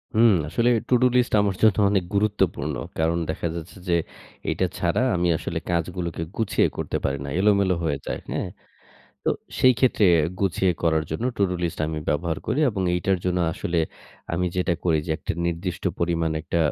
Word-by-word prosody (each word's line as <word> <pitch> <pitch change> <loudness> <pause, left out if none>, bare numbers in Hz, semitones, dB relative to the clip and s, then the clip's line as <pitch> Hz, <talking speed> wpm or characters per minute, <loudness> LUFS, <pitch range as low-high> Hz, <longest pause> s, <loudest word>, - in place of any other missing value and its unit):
হুম, 115 +1 +6 0.2
আসলে 115 +10 +2 0.2
to do 125 0 +4
list 125 -1 +2
আমার 100 -2 0
জন্য 110 -3 +5
অনেক 95 -3 +2
গুরুত্বপূর্ণ। 95 -8 +1 0.2
কারণ 80 +1 +2
দেখা 80 +1 -2
যাচ্ছে 85 +3 -8
যে, 85 - +4 0.6
এটা - - +1
ছাড়া 110 - +1
আমি 90 0 +1
আসলে - - -3
কাজগুলোকে 85 0 -2 0.2
গুছিয়ে 110 -3 +2
করতে - - -2
পারি 70 0 0
না, 70 - -5
এলোমেলো 100 -2 +3
হয়ে 75 -3 0
যায়। - - -3
হ্যাঁ? - - -2 0.8
তো - - +1 0.3
সেই 130 - +6
ক্ষেত্রে 125 -4 +3 0.4
গুছিয়ে 95 -1 +2
করার 80 -2 +2
জন্য 80 +9 -3
টু-ডু 95 -2 +1
লিস্ট 85 -2 -2
আমি 80 0 -3
ব্যবহার 80 +1 0
করি 130 +7 0
এবং 100 -4 -2
এইটার 95 +1 +1
জন্য 90 0 +1
আসলে 85 +1 -2 0.5
আমি 90 +2 0
যেটা 90 -1 +1
করি 80 -3 +3
যে, - - -3
একটা - - -3
নির্দিষ্ট 85 +2 -3
পরিমাণ 85 -1 0
একটা 85 - -2
90 Hz, 170 wpm, -24 LUFS, 85-100 Hz, 0.8 s, হুম